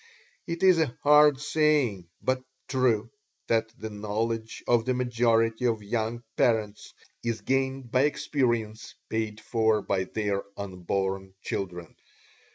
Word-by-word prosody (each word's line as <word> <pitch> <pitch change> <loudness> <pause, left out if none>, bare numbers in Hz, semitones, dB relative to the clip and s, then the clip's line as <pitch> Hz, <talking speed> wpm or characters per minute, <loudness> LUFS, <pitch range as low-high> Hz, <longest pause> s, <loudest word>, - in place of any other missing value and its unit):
It 170 +1 -3
is 185 -3 +6
a 145 -7 0
hard 150 -1 +6
saying, 145 - +1 0.2
but 130 0 +1 0.3
true 120 -4 +1 0.3
that 115 -1 +1
"the 110 - -5
knowledge 110 +2 -3
of 120 -2 +4
the 130 +2 0
majority 115 -1 +2
of 110 -3 -1
young 115 +2 -2
parents 110 -4 0 0.3
is 115 -1 -2
gained 135 -2 -1
by 130 +2 +4
experience 120 -7 -1
paid 110 -1 -2
for 110 -3 +1
by 95 -1 0
their 100 0 -1 0.2
unborn 95 0 -3
children." 90 -3 -4
115 Hz, 125 wpm, -27 LUFS, 105-130 Hz, 0.3 s, is